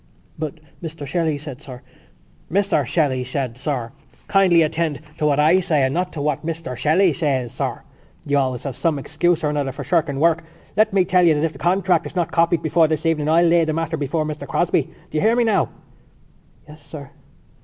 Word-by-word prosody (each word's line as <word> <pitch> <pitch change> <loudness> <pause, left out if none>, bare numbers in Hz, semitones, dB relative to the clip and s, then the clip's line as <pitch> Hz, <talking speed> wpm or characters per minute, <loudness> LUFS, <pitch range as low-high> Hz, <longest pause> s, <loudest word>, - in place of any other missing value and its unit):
"But 155 0 -4 0.2
Mr 160 -3 -6
Shelley 160 +1 -1
said, 145 -2 -9
sir——" 130 -4 -11 0.7
"Mr 190 -7 +1
Shelley 140 -3 +1
said, 130 -2 -3
sir.... 130 -3 -3 0.4
Kindly 185 -4 +4
attend 160 -1 -1 0.2
to 150 - +2
what 145 -1 +2
I 160 +5 +5
say 165 -7 +1
and 130 0 +1
not 180 +2 -1
to 150 - -4
what 150 -1 -1
Mr 160 -5 -4
Shelley 165 +7 +3
says, 135 -7 -1
sir. - - -4 0.4
You 145 0 +1
have 140 - +3
always 125 -2 -5
some 165 -3 0
excuse 160 +4 0
or 150 - +1
another 145 -2 -1
for 130 - -7
shirking 160 -6 0
work. 165 +1 +2 0.3
Let 215 +1 +3
me 190 -2 +3
tell 180 +1 +3
you 165 -3 +5
that 150 - -1
if 165 -1 0
the 135 - -13
contract 180 0 +1
is - - -12
not 175 -2 -1
copied 170 0 +2
before 160 +1 +3
this 155 +1 -2
evening 155 -2 +1
I'll 170 +2 +4
lay 170 0 +4
the 155 -1 -1
matter 165 0 -2
before 155 +1 -1
Mr 150 0 -6
Crosbie.... - - 0 0.2
Do 155 - -2
you - - -1
hear 225 +2 +3
me 240 - +3
now?" 220 -4 +2 1.0
"Yes, 150 0 -13
sir." 145 -2 -10
155 Hz, 210 wpm, -21 LUFS, 145-170 Hz, 1.0 s, I